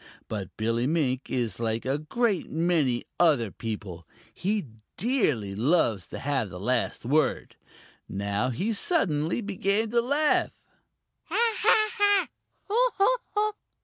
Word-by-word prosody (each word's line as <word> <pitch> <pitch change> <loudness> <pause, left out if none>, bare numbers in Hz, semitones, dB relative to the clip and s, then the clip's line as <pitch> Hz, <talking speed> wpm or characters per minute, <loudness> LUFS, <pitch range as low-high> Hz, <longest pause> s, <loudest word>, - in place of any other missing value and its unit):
But 100 -4 -6
Billy 115 +3 0
Mink 140 -5 0
is 115 -6 -1
like 115 0 -2
a 135 +3 0
great 200 +5 0
many 160 -7 +1 0.2
other 140 - +3
people; 100 -7 -6 0.3
he 200 0 -1 0.3
dearly 155 - 0
loves 115 - +1
to - - -7
have 135 -7 -1
the 90 -1 -8
last 120 +3 -1
word. 150 +5 +1 0.5
Now 100 +5 -1
he 195 - -1
suddenly 175 - +1
began 205 +2 -1
to 235 0 +3
laugh. 290 +5 +1 0.6
"Ha, 460 0 +1
ha, 410 -3 +3 0.4
ha! 430 -1 +1
155 Hz, 115 wpm, -27 LUFS, -, 0.6 s, other